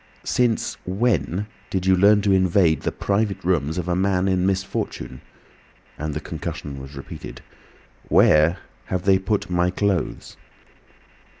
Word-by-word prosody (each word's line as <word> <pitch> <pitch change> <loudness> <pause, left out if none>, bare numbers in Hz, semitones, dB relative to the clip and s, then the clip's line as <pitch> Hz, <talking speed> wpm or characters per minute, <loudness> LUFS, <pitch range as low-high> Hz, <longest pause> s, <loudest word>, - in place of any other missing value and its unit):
"Since 120 -3 0
when 95 - 0 0.2
did 95 -1 -2
you 95 0 +5
learn 100 +2 +5
to 100 - +2
invade 90 -4 +3
the - - -1
private 100 0 -1
rooms 80 -3 0
of 90 -1 -3
a 90 - +1
man 95 0 +1
in 95 -1 +1
misfortune?" 95 -8 -3 0.7
and 75 -1 -4
the - - -1
concussion 70 -2 -6
was 70 +2 -10
repeated. 70 - -9 0.7
"Where 75 +3 +5 0.3
have 90 -1 -3
they 95 -1 +4
put 100 +2 -1
my 90 0 +2
clothes?" 100 -2 -2
95 Hz, 135 wpm, -23 LUFS, 80-100 Hz, 0.7 s, you